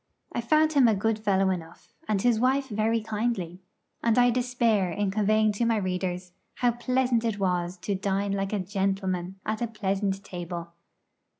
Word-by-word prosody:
I -, -, -1 dB
found 310 Hz, +6 st, +3 dB
him 275 Hz, -4 st, +6 dB
a 220 Hz, -, +3 dB
good 220 Hz, +2 st, 0 dB
fellow 195 Hz, -3 st, +2 dB
enough, 165 Hz, -3 st, -7 dB
and 215 Hz, -2 st, +1 dB
his 240 Hz, -3 st, +3 dB
wife 265 Hz, +2 st, +1 dB
very 220 Hz, +1 st, +1 dB
kindly; 210 Hz, -5 st, -2 dB, 0.4 s
and 230 Hz, 0 st, +2 dB
I 245 Hz, 0 st, +5 dB
despair 235 Hz, -5 st, +1 dB
in 195 Hz, +3 st, -1 dB
conveying 215 Hz, +1 st, +3 dB
to 210 Hz, +3 st, -1 dB
my 230 Hz, -1 st, +2 dB
readers 180 Hz, -2 st, -3 dB, 0.2 s
how 245 Hz, -1 st, +2 dB
pleasant 250 Hz, 0 st, +1 dB
it 225 Hz, -3 st, -1 dB
was 180 Hz, -2 st, -1 dB
to 205 Hz, -, -1 dB
dine 195 Hz, +1 st, -1 dB
like 195 Hz, 0 st, -1 dB
a 210 Hz, -, 0 dB
gentleman 190 Hz, -1 st, -2 dB
at 215 Hz, +1 st, -2 dB
a 235 Hz, -, 0 dB
pleasant 200 Hz, -2 st, -2 dB
table. 170 Hz, -1 st, -6 dB
205 Hz, 175 wpm, -27 LUFS, 190-230 Hz, 0.4 s, him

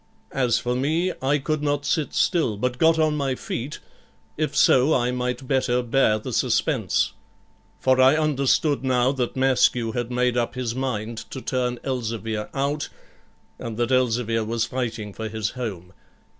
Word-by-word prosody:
As 125 Hz, -4 st, +2 dB
for 125 Hz, 0 st, -1 dB
me, 160 Hz, +8 st, 0 dB
I 135 Hz, +3 st, +2 dB
could 150 Hz, +1 st, -2 dB
not 145 Hz, -1 st, -1 dB
sit 155 Hz, -3 st, -1 dB
still, 155 Hz, -, +2 dB
but 125 Hz, +3 st, -2 dB
got 160 Hz, 0 st, +5 dB
on 155 Hz, -1 st, +2 dB
my 135 Hz, -3 st, -1 dB
feet, 130 Hz, +4 st, -5 dB, 0.6 s
if 155 Hz, 0 st, -2 dB
so 130 Hz, +5 st, +5 dB
I 125 Hz, 0 st, +1 dB
might 125 Hz, +1 st, -3 dB
better 125 Hz, -2 st, +1 dB
bear 120 Hz, -3 st, +3 dB
the 110 Hz, -, -6 dB
suspense; -, -, +1 dB, 0.7 s
for 130 Hz, 0 st, +3 dB
I 130 Hz, +3 st, +6 dB
understood 145 Hz, -1 st, +1 dB
now 130 Hz, -1 st, +2 dB
that 125 Hz, -3 st, -2 dB
Maskew 130 Hz, -3 st, +2 dB
had 120 Hz, 0 st, -2 dB
made 125 Hz, 0 st, +1 dB
up 120 Hz, 0 st, -1 dB
his 125 Hz, -3 st, -2 dB
mind 120 Hz, -3 st, -3 dB
to 130 Hz, -, -6 dB
turn 125 Hz, -1 st, -1 dB
Elzevir 115 Hz, -4 st, -3 dB
out, 140 Hz, +2 st, -2 dB, 0.7 s
and 115 Hz, -2 st, -6 dB
that 120 Hz, +1 st, 0 dB
Elzevir 115 Hz, -3 st, +1 dB
was 115 Hz, +1 st, -1 dB
fighting 115 Hz, -4 st, -4 dB
for 110 Hz, +1 st, -5 dB
his 110 Hz, -1 st, -2 dB
home. 95 Hz, -8 st, -6 dB
125 Hz, 160 wpm, -24 LUFS, 115-135 Hz, 0.7 s, I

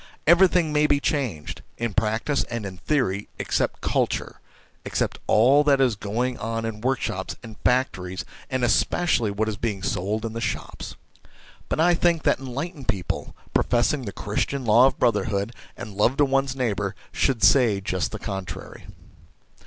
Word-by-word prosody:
Everything 175 Hz, -1 st, +5 dB
may 150 Hz, 0 st, +4 dB
be 145 Hz, -1 st, +3 dB
changed, 125 Hz, -, -2 dB, 0.2 s
in 115 Hz, -2 st, -2 dB
practice 110 Hz, +7 st, 0 dB
and 115 Hz, -3 st, -5 dB
in 95 Hz, -2 st, -7 dB
theory, 105 Hz, -10 st, 0 dB
except -, -, -1 dB
culture, -, -, -1 dB, 0.4 s
except -, -, -2 dB
all 130 Hz, +7 st, +5 dB
that 140 Hz, -2 st, +4 dB
is 130 Hz, -5 st, +3 dB
going 120 Hz, +5 st, -2 dB
on 115 Hz, 0 st, -3 dB
in 110 Hz, -1 st, -5 dB
workshops 120 Hz, -7 st, -2 dB
and 110 Hz, -2 st, -9 dB
factories, 95 Hz, -8 st, 0 dB, 0.2 s
and 130 Hz, -2 st, -1 dB
especially 120 Hz, -2 st, +2 dB
what 105 Hz, +2 st, -1 dB
is 110 Hz, -2 st, -3 dB
being 105 Hz, -5 st, -3 dB
sold 105 Hz, +5 st, -1 dB
in 110 Hz, -, -4 dB
the 115 Hz, -, -4 dB
shops. -, -, -4 dB, 0.7 s
But -, -, -1 dB
I 175 Hz, +2 st, +5 dB
think 170 Hz, -2 st, +2 dB
that -, -, +2 dB
enlightened 135 Hz, +3 st, -6 dB
people, 100 Hz, -5 st, -3 dB, 0.2 s
pro -, -, +3 dB
fessing 125 Hz, +1 st, +1 dB
the -, -, -3 dB
Christian 125 Hz, +7 st, -2 dB
law 115 Hz, +4 st, +6 dB
of -, -, -2 dB
brotherhood 105 Hz, -1 st, 0 dB, 0.2 s
and 105 Hz, -, -7 dB
love 110 Hz, +7 st, +2 dB
to 145 Hz, -, +5 dB
one's 135 Hz, -1 st, 0 dB
neighbour, 105 Hz, -6 st, -1 dB, 0.2 s
should 130 Hz, -5 st, 0 dB
say 115 Hz, -7 st, +5 dB
just 90 Hz, -3 st, -2 dB
the -, -, -4 dB
con 95 Hz, -1 st, -4 dB
trary. 80 Hz, -, -9 dB
115 Hz, 165 wpm, -24 LUFS, 105-135 Hz, 0.7 s, law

